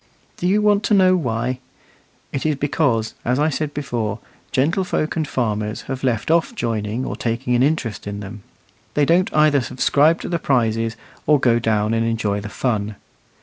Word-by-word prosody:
Do 175 - -1
you 205 +3 +3
want 205 -1 +4
to 210 - +3
know 185 -1 +5
why? 125 -5 -1 0.7
It 135 - -2
is 155 -1 +1
because, 135 -5 0
as 125 +2 +1
I 150 +2 +2
said 150 0 -2
before, 120 -7 -3 0.3
gentlefolk 155 +3 0
and 160 -3 -1
farmers 105 -4 -2
have 130 0 -5
left 125 +2 0
off 170 +8 +2
joining 115 - -2
or - - -3
taking 120 +2 -2
an 120 - +3
interest 130 -8 0
in 100 0 -4
them. 100 +1 -8 0.5
They 145 - +3
don't 175 +4 +3
either 150 -2 +4
subscribe 145 +6 +2
to - - -5
the 170 -1 -1
prizes, 115 -5 +1 0.3
or 150 -1 +5
go 120 -2 +3
down 110 -1 +1
and 115 0 +1
enjoy 110 -3 -1
the 105 - -6
fun. 105 -3 -2
125 Hz, 180 wpm, -21 LUFS, 115-155 Hz, 0.7 s, know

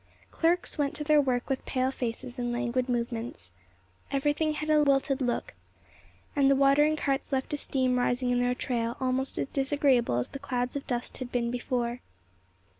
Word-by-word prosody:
Clerks 335 -1 +1
went 285 +1 0
to 300 - -1
their 300 0 +5
work 250 -3 -1
with 270 -1 -2
pale 255 0 0
faces 250 0 -5
and 240 0 -1
languid 245 +1 -1
movements. 235 - -3 0.6
Everything 295 +3 +1
had 305 +1 -2
a 305 -1 +5
wilted 275 -1 +2
look, 245 -2 -1 0.8
and 275 -1 +4
the 275 - +5
watering 280 +3 +4
carts 275 -2 -1
left 265 +2 -1
a - - 0
steam 255 -3 +1
rising 245 0 +1
in 245 - +2
their 245 0 +1
trail, 235 -2 -2
almost 260 +1 -1
as - - 0
disagreeable 270 - +2
as 125 - -1
the 275 - -7
clouds 250 -2 -2
of 280 - -4
dust 245 -1 -3
had 255 -1 -6
been 235 -1 0
before. 245 -1 -2
260 Hz, 180 wpm, -28 LUFS, 245-280 Hz, 0.8 s, their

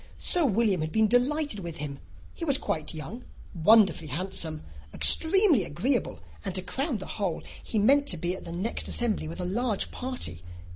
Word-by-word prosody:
Sir 345 -5 +3
William 210 -5 0
had 155 0 -4
been 220 +3 +2
delighted 255 +1 0
with 170 -3 -6
him. 140 -2 -6 0.3
He - - -9
was 280 -4 +2
quite 155 - -3
young, 200 +10 -8 0.3
wonderfully 195 -1 +3
handsome, 165 -2 -4 0.3
extremely 330 - +7
agreeable, 235 - -3 0.2
and, 195 -3 -5
to 185 - -1
crown 270 - -3
the 190 - -8
whole, 195 -6 -4 0.2
he 225 - -5
meant 275 +7 +3
to 180 - -1
be 175 +3 -3
at - - -11
the 170 - -9
next 185 +7 -4
assembly 220 -9 -1
with 165 - -8
a 180 - -3
large 215 +3 -2
party. 250 - -5
205 Hz, 180 wpm, -26 LUFS, 170-250 Hz, 0.3 s, extremely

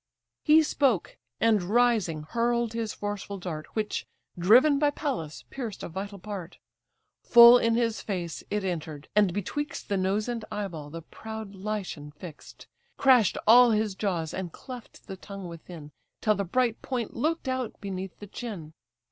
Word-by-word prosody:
He 315 +1 +6
spoke, 270 - +1 0.2
and 225 -3 +3
rising 205 -6 +2
hurl'd 235 +5 0
his 225 -2 -2
forceful 205 -1 -5
dart, 165 -4 -6
Which, 215 -1 -2 0.3
driven 250 - +5
by 295 0 +4
Pallas, 260 - -4
pierced 235 -7 -6
a - - -5
vital 200 +4 -6
part; 190 -2 -7 0.6
Full 235 +1 +9
in 230 -1 +2
his 230 -2 0
face 175 -5 -4
it 210 -1 -1
enter'd, 160 -5 -4
and 205 -3 +4
betwixt 220 - -4
The 200 - +1
nose 195 +4 0
and 235 -2 -3
eye 210 -1 -2
ball 155 -4 -8
the 165 +2 -8
proud 220 +3 -8
Lycian 195 -7 -5
fix'd; 155 0 -11 0.3
Crash'd 255 -6 +5
all 245 +2 +8
his 215 -2 +1
jaws, 175 -5 -2
and 185 -2 -4
cleft 250 +3 -11
the 190 - -8
tongue 195 -1 -8
within, 165 -2 -10 0.3
Till 215 - +3
the 200 -1 -2
bright 235 +4 0
point 245 -4 -3
look'd 315 +4 -1
out 255 -3 -3
beneath 190 -2 -6
the 205 - -9
chin. 195 -7 -7
210 Hz, 160 wpm, -27 LUFS, 180-235 Hz, 0.6 s, Full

